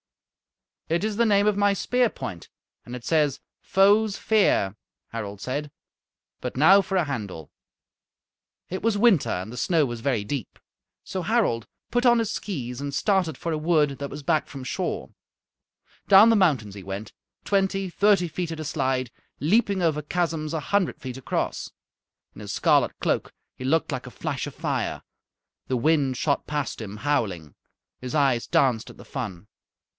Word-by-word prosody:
"It 170 +4 +1
is 215 -1 -1
the 235 +2 +3
name 200 -1 +4
of 210 - +3
my 205 0 +3
spear 245 +4 +1
point, 90 - -7 0.4
and 120 - -7
it 125 - -9
says, 150 -4 +2 0.2
'Foes' 200 +2 +3
fear,'" 195 - +2 0.3
Harald 105 -3 -6
said. 145 +6 -4 0.7
"But 125 0 -5
now 190 +8 +7
for 195 0 -2
a 175 - +2
handle." 100 - -5 1.2
It 185 - -4
was 225 -2 +1
winter 205 - +4
and 95 +6 -3
the - - -8
snow 160 +3 +2
was 120 -3 -5
very 115 -5 0
deep. 125 +1 -5 0.5
So 190 - -3
Harald 185 - +1 0.3
put 245 +1 +1
on 240 -1 +6
his 225 -2 -1
skees 130 - -4
and 140 0 -4
started 180 -5 +1
for 170 - -3
a 155 - -1
wood 150 -4 +2
that 140 0 -4
was 150 - -8
back 155 +2 +1
from 135 -2 -8
shore. - - -3 1.0
Down 200 +3 +8
the 230 - +5
mountains 140 - +2
he 100 - -9
went, 95 +3 -6 0.3
twenty, 195 -1 +1
thirty 200 -1 +3
feet 170 +1 -4
at 160 - -5
a 155 - -4
slide, 130 -5 -1 0.3
leaping 200 +4 +2
over 155 -3 +1
chasms 160 -1 -2
a 160 - 0
hundred 195 +4 0
feet 130 -2 -6
across. 130 - -3 0.6
In - - -11
his - - -6
scarlet - - +2
cloak - - -1 0.2
he - - -8
looked 155 +5 +1
like 130 -1 -4
a - - -9
flash 145 -4 -3
of - - -9
fire. - - -2 0.6
The 130 - 0
wind 140 -1 +2
shot 140 +1 0
past 145 -5 -3
him 105 -1 -7
howling. 105 - -1 0.5
His 125 -1 -5
eyes 135 -5 +2
danced 120 -5 +2
at - - -13
the - - -13
fun. 105 -8 -6
150 Hz, 170 wpm, -25 LUFS, 125-195 Hz, 1.2 s, Down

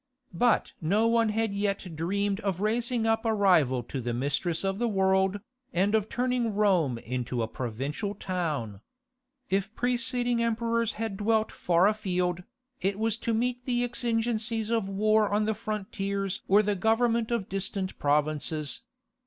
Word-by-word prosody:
But 240 +7 +2
no 200 +8 +2
one 230 -1 +3
had 220 -1 0
yet 200 -4 -2
dreamed 200 +5 -1
of 195 -5 -2
raising 230 +2 0
up 225 0 +2
a 225 -1 +1
rival 160 - +3
to 130 +3 -5
the 120 0 -2
mistress 145 +7 -1
of 195 +1 -1
the 240 - +1
world, 190 -1 +2 0.3
and 195 +4 +2
of 215 -1 +1
turning 245 -3 0
Rome 180 - +2
into 125 0 -3
a - - -1
provincial 135 - -4
town. 150 - -3 0.7
If 195 +3 0
preceding 245 -1 0
emperors 230 0 0
had 220 -2 -4
dwelt 220 +1 +1
far 175 +1 +2
afield, 180 -4 0 0.4
it 195 +1 0
was 220 0 +1
to 230 - -2
meet 245 +2 -1
the 245 -1 +1
exigencies 230 -2 -1
of 225 -4 0
war 215 +1 +3
on 210 +1 +2
the 220 - +1
frontiers 200 -2 -3
or 205 +2 +5
the 205 0 0
government 225 +3 +2
of 235 -5 -1
distant 195 0 -3
provinces. 150 0 0
205 Hz, 155 wpm, -28 LUFS, 180-225 Hz, 0.7 s, or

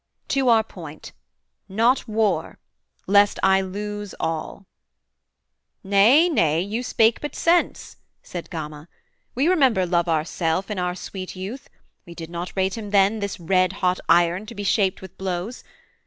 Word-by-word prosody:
To 270 -2 +2
our 225 -1 +5
point: 160 -8 -11 0.6
not 235 +7 +2
war: 210 -7 0 0.5
Lest 205 +1 +4
I 195 0 +4
lose 205 +1 -5
all.' 160 +4 -4 1.2
'Nay, 210 - +5
nay, 165 - +2
you 205 +6 -2
spake 225 -2 +2
but 295 - -5
sense' 340 +1 +1 0.3
Said 175 -2 -7
Gama. 155 -1 -7 0.5
'We 270 +5 +2
remember 265 - +3
love 175 0 +1
ourself 165 +4 -1
In 205 - -3
our 180 0 -1
sweet 185 0 -7
youth; 210 +10 -7 0.3
we 170 - -12
did 165 0 -8
not 175 +1 -5
rate 190 +3 0
him 210 -2 -7
then 200 +2 +3
This 200 -2 -4
red 185 +1 +2
hot 185 -2 0
iron 175 +4 +3
to 230 - -9
be 205 - -5
shaped 195 -1 +1
with 190 - -11
blows. 190 +5 -4
195 Hz, 150 wpm, -23 LUFS, 175-220 Hz, 1.2 s, our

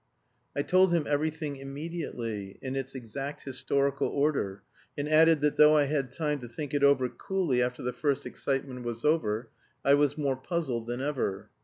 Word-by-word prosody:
I 145 - 0
told 185 +2 +4
him 160 -3 +1
everything 150 0 -1
immediately, 135 - -5
in 130 0 -3
its 135 0 -4
exact 135 +4 -6
historical 140 +1 0
order, 135 -10 0 0.3
and 145 0 -2
added 160 0 +5
that 150 0 +1
though 150 0 +7
I 150 - +5
had 140 -3 -1
time 150 0 -1
to 120 - -8
think 140 +5 -6
it 145 -1 +1
over 140 -2 +5
coolly 170 -4 -1
after 125 0 -1
the 125 0 -2
first 140 -2 0
excitement 135 -2 -3
was 120 +1 -4
over, 120 -7 +1 0.3
I 140 - +6
was 145 0 +3
more 140 -3 0
puzzled 130 -6 -2
than 120 +2 -3
ever. 105 -8 -2
140 Hz, 175 wpm, -29 LUFS, 125-150 Hz, 0.3 s, though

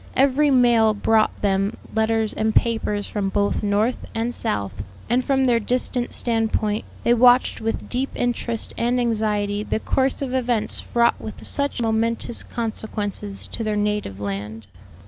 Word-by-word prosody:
Every 280 +2 +4
mail 240 -4 +4
brought 215 +1 +1
them 195 +1 +1 0.2
letters 220 0 +1
and 220 0 -1
papers 215 -3 +1
from 200 -2 -2
both 200 +1 0
North 210 +4 +1 0.2
and 230 +2 -1
South, 100 - -3 0.3
and 250 +2 +3
from 265 0 +2
their 240 -2 +3
distant 245 +1 -1
standpoint 225 -2 0 0.2
they 235 - +4
watched 245 +1 +4
with 225 0 -3
deep 260 +2 -2
interest 235 -1 -2
and 245 +2 +1
anxiety 210 -3 0
the 215 - -2
course 265 +4 0
of 260 -2 -4
events 245 -4 0
fraught 235 0 +1
with 215 - -8
such 280 -4 -1
momentous 230 +1 0
consequences 210 -3 -4
to 230 - -4
their 215 -1 -1
native 210 - -1
land. 105 +2 -5
225 Hz, 145 wpm, -22 LUFS, 210-245 Hz, 0.3 s, Every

